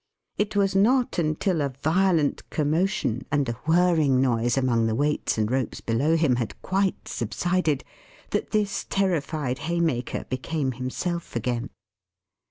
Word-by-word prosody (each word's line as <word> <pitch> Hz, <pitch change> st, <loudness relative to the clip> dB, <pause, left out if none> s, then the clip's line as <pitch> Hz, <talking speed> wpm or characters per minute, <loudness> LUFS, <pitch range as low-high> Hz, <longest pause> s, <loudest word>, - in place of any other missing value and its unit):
It 210 Hz, 0 st, 0 dB
was 195 Hz, -1 st, +2 dB
not 240 Hz, +3 st, +3 dB
until 160 Hz, +2 st, 0 dB
a 140 Hz, -3 st, -2 dB
violent 165 Hz, -2 st, +2 dB
commotion 155 Hz, -, 0 dB
and 145 Hz, -2 st, +1 dB
a -, -, 0 dB, 0.2 s
whirring 160 Hz, -6 st, +4 dB
noise 120 Hz, -1 st, +1 dB
among 120 Hz, -4 st, +2 dB
the 110 Hz, -, 0 dB
weights 145 Hz, 0 st, 0 dB
and 110 Hz, +1 st, 0 dB
ropes 130 Hz, -1 st, -1 dB
below 135 Hz, +8 st, +1 dB
him 150 Hz, -7 st, +2 dB
had 120 Hz, -3 st, -4 dB
quite 190 Hz, 0 st, 0 dB
subsided, 175 Hz, -6 st, -1 dB, 0.5 s
that -, -, -1 dB
this 210 Hz, -2 st, 0 dB
terrified 155 Hz, -8 st, 0 dB
Haymaker 160 Hz, -6 st, -1 dB
became 135 Hz, +2 st, -2 dB
himself 130 Hz, +8 st, -4 dB
again. 120 Hz, +2 st, -2 dB
150 Hz, 135 wpm, -25 LUFS, 130-180 Hz, 0.5 s, whirring